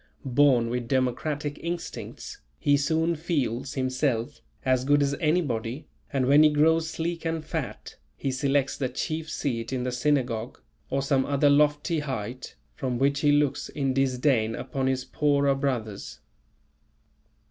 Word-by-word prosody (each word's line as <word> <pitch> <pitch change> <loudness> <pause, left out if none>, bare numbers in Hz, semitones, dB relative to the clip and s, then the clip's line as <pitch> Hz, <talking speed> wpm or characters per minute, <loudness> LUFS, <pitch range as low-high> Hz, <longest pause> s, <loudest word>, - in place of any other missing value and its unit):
Born 130 -3 +3
with 125 -1 -2
democratic 140 +3 -1
instincts, 170 0 -6 0.2
he 145 - +3
soon 160 +4 +1
feels 140 -6 -2
himself 130 0 -1 0.2
as 130 -1 +2
good 145 +1 +3
as 140 0 0
anybody, 145 -6 0 0.3
and 135 -3 +1
when 140 +3 +6
he 155 - +7
grows 160 +2 +3
sleek 165 +1 -3
and 165 -1 -2
fat, - - -5 0.2
he 135 - -2
selects 135 +1 +1
"the 130 -3 -2
chief 155 +4 -3
seat 115 -7 -3
in 130 -2 -1
the 125 - -1
synagogue" 125 -3 -1 0.3
or 135 0 0
some 135 -1 +2
other 145 +1 +3
lofty 150 +3 +2
height, 130 -3 -5 0.2
from 125 -2 -2
which 140 +2 +2
he 145 0 +3
looks 145 -1 +1
in 135 -2 -1
disdain 130 -4 +1
upon 130 +1 -3
his 130 -1 0
poorer 140 -2 +2
brothers. 125 -7 -3
140 Hz, 145 wpm, -26 LUFS, 130-150 Hz, 0.3 s, he